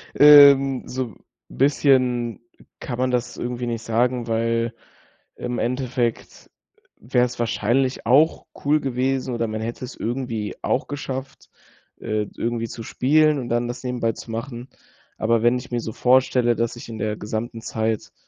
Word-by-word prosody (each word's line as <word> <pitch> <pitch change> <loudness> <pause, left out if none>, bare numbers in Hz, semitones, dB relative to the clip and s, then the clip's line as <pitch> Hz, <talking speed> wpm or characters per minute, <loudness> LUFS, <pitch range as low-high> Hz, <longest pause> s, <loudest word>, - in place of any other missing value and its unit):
ähm, 140 -2 +7
so 130 0 -3
'n 105 - -15 0.3
bisschen 130 -4 +2 0.4
kann 125 -2 -5
man 130 0 +1
das 120 -1 -1
irgendwie 120 0 -4
nicht 115 -1 -3
sagen, 120 +1 0
weil 115 +1 0 0.6
im 125 -1 -4
Endeffekt 125 -1 -2 0.5
wäre 125 +1 +1
es 125 0 -8
wahrscheinlich 120 +3 0
auch 145 +7 +3 0.2
cool 150 +2 +3
gewesen 130 -1 -1
oder 115 -1 -1
man 110 0 -4
hätte 115 +3 -5
es 125 - -8
irgendwie 115 -3 -3
auch 130 - 0
geschafft, 135 -2 -6 0.5
äh, 110 -1 -2
d - - -15
irgendwie 115 0 -2
zu 115 - -8
spielen 155 +2 +3
und 120 - -6
dann 120 +1 0
das 120 - -6
nebenbei 120 -2 -1
zu 115 - -11
machen. 120 +2 -6 0.5
Aber 115 0 +1
wenn 120 +1 +3
ich 125 - -10
mir 120 - 0
so 110 - -6
vorstelle, 125 -1 +3
dass 115 +1 -1
ich 120 - -10
in 110 -1 -7
der 105 +1 -2
gesamten 110 +2 -5
Zeit 110 -1 -2
120 Hz, 160 wpm, -22 LUFS, 115-130 Hz, 0.6 s, ähm